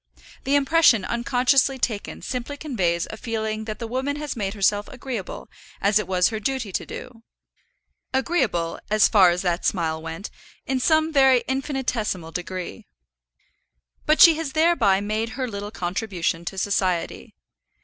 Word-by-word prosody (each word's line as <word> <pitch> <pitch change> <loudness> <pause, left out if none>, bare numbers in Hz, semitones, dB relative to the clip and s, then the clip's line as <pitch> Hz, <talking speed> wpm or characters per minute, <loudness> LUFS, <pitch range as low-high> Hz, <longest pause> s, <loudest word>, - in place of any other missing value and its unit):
The 275 - +2
impression 280 - +4
unconsciously 250 +3 +2
taken 220 -5 -3
simply 255 +3 -4
conveys 180 - -1
a 220 - -7
feeling 220 -1 -3
that 215 -1 -5
the 235 - -5
woman 260 +5 -2
has 295 0 -5
made 200 -2 -3
herself 205 +1 +1
agreeable, 250 -6 -6 0.3
as 205 +1 +3
it 210 - -4
was 180 -1 +2
her 220 -2 -4
duty 255 -3 -2
to - - -3
do, 245 -3 -9 0.9
agreeable, 255 - 0
as 215 0 +5
far 190 -4 +6
as 175 +2 -1
that 175 -1 -1
smile 160 -4 -1
went, 165 +5 -7 0.3
in 265 -1 -1
some 315 +3 +2
very 265 -3 +5
infinitesimal 250 - -2
degree. 185 +5 -6 1.2
But 310 +1 +3
she 335 - +10
has 315 -4 -4
thereby 275 - +3
made 215 +4 -3
her 260 -2 -1
little 205 -2 -5
contribution 175 -3 -3
to 190 - -5
society. 185 -3 -1
220 Hz, 150 wpm, -23 LUFS, 190-265 Hz, 1.2 s, she